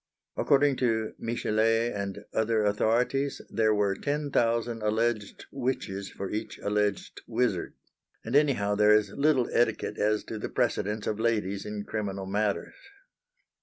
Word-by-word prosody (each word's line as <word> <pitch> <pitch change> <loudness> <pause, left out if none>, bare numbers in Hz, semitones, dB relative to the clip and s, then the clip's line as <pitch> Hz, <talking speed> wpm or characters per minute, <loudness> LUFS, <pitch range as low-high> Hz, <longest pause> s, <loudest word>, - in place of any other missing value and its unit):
According 140 -1 +3
to 110 -3 0
Michelet 115 0 +1
and 100 0 -5
other 110 -1 +1
authorities 120 +7 +1
there 110 -1 +2
were 105 -2 +2
ten 145 +6 -2
thousand 115 -1 +1
alleged 110 0 -1
witches 120 -7 -3
for 100 - -6
each 105 - -4
alleged 105 -1 -1
wizard! - - -1 0.5
and 115 +4 -2
anyhow 130 -9 +3
there 105 +1 +5
is 105 -2 +2
little 140 -2 +2
etiquette 115 -2 +1
as 105 0 +1
to 110 - -6
the - - -4
precedence 105 +1 -1
of 105 - -2
ladies 105 -4 0
in 105 -1 -4
criminal 100 -3 -4
matters. 100 +1 -1
110 Hz, 135 wpm, -28 LUFS, 105-120 Hz, 0.5 s, there